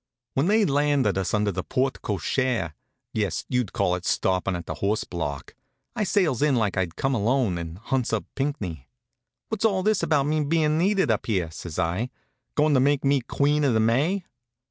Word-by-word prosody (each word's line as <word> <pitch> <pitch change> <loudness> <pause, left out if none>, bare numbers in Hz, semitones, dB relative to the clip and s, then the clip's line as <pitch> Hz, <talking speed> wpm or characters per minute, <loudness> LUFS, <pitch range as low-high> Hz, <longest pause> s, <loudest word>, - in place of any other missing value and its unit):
When 140 +5 +1
they'd 215 +1 +4
landed 145 -6 +2
us 95 - -1
under 105 -1 +1
the 90 0 -3
porte 130 +1 -1
cochere 105 - -1 0.4
yes, 105 -5 -1
you'd 125 -5 0
call 100 -6 +1
it 90 0 -3
stoppin' 95 0 0
at 85 -1 -5
the - - -4
horse 105 +2 +1
block 75 -5 -5 0.4
I 210 - 0
sails 175 - +1
in 150 -2 +3
like 110 -5 +1
I'd 90 -3 -1
come 135 0 0
alone, 115 -4 +1
and 85 0 -6
hunts 125 +3 -1
up 115 -2 -1
Pinckney. 100 - -3 0.6
"What's 220 -2 -3
all 195 -4 +2
this 215 0 +2
about 145 -3 +2
me 155 +1 +1
bein' 155 +1 +2
needed 190 - +2
up 110 - -1
here?" 90 -7 0
says 80 0 -8
I. 90 +8 0 0.5
"Goin' 150 0 +3
to 130 - +5
make 140 +1 +2
me 140 -1 +3
Queen 145 +4 +1
of 130 -5 +3
the - - +3
May?" 145 - +1
125 Hz, 190 wpm, -25 LUFS, 95-150 Hz, 0.6 s, to